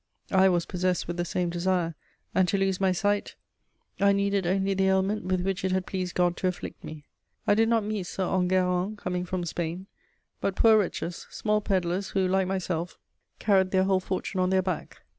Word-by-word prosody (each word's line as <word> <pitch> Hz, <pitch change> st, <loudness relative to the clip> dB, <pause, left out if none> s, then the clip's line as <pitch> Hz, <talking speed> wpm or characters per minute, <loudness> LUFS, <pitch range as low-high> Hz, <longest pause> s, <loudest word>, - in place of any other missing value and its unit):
I 190 Hz, 0 st, +5 dB
was 175 Hz, -2 st, +1 dB
possessed 180 Hz, -1 st, -1 dB
with 175 Hz, +1 st, -4 dB
the 175 Hz, -, -1 dB
same 175 Hz, -1 st, -1 dB
desire, 175 Hz, -1 st, 0 dB, 0.4 s
and 185 Hz, -1 st, +3 dB
to 200 Hz, -, +1 dB
lose 195 Hz, -1 st, 0 dB
my 190 Hz, -1 st, +3 dB
sight 205 Hz, +3 st, 0 dB, 0.6 s
I 200 Hz, 0 st, +5 dB
needed 200 Hz, -2 st, +1 dB
only 195 Hz, +2 st, +1 dB
the 190 Hz, 0 st, +2 dB
ailment 190 Hz, +2 st, +1 dB
with 185 Hz, -1 st, 0 dB
which 190 Hz, 0 st, -2 dB
it 190 Hz, -, 0 dB
had 185 Hz, 0 st, 0 dB
pleased 185 Hz, -2 st, -4 dB
God 175 Hz, -1 st, +2 dB
to 185 Hz, -, 0 dB
afflict 180 Hz, -, -5 dB
me. 155 Hz, -1 st, -9 dB, 0.4 s
I -, -, +4 dB
did 225 Hz, +2 st, +3 dB
not 230 Hz, -2 st, +3 dB
meet 205 Hz, -3 st, -3 dB
"Sir 190 Hz, -, -2 dB
Enguerrand 185 Hz, +2 st, +1 dB
coming 180 Hz, -2 st, -3 dB
from 180 Hz, -1 st, -3 dB
Spain," 170 Hz, +2 st, -4 dB, 0.5 s
but 195 Hz, -, -1 dB
poor 225 Hz, -1 st, +6 dB
wretches, 180 Hz, -3 st, -3 dB
small 210 Hz, -1 st, 0 dB
pedlars 190 Hz, -1 st, -1 dB
who, 190 Hz, -1 st, +1 dB
like 190 Hz, 0 st, +1 dB
myself, 180 Hz, -2 st, -3 dB, 0.4 s
carried 190 Hz, -3 st, +3 dB
their 190 Hz, 0 st, +3 dB
whole 190 Hz, 0 st, +2 dB
fortune 185 Hz, +1 st, -3 dB
on 185 Hz, 0 st, +2 dB
their 190 Hz, 0 st, +2 dB
back. 185 Hz, -3 st, -4 dB
185 Hz, 200 wpm, -27 LUFS, 180-195 Hz, 0.6 s, poor